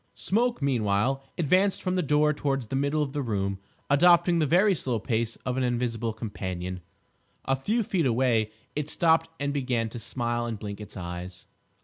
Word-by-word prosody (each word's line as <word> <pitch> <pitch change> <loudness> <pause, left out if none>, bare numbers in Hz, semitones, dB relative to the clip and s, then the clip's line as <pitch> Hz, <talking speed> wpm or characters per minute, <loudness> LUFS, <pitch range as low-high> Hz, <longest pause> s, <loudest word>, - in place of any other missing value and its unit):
Smoke, 235 - 0
meanwhile, 125 +1 +1
advanced 185 +5 +2
from 185 - 0
the 185 - +1
door 150 0 +3
towards 135 -3 -1
the 120 - -4
middle 140 +3 +1
of 140 -2 -5
the 145 - -1
room, 100 -5 -2 0.3
adopting 170 +3 +5
the 155 - +2
very 190 +7 +4
slow 130 -7 -1
pace 115 +1 -1
of 125 0 -1
an 130 - +1
invisible 120 -2 -1
companion. 95 -4 -5 0.6
A 135 - +2
few 215 - 0
feet 175 -7 +1
away 115 -3 +2 0.3
it 150 0 -2
stopped 165 0 +3
and 140 0 -1
began 125 -5 0
to 120 - -7
smile 120 0 -2
and 115 -2 -3
blink 100 0 -6
its 105 - -9
eyes. 90 0 -7
130 Hz, 175 wpm, -27 LUFS, 110-150 Hz, 0.6 s, adopting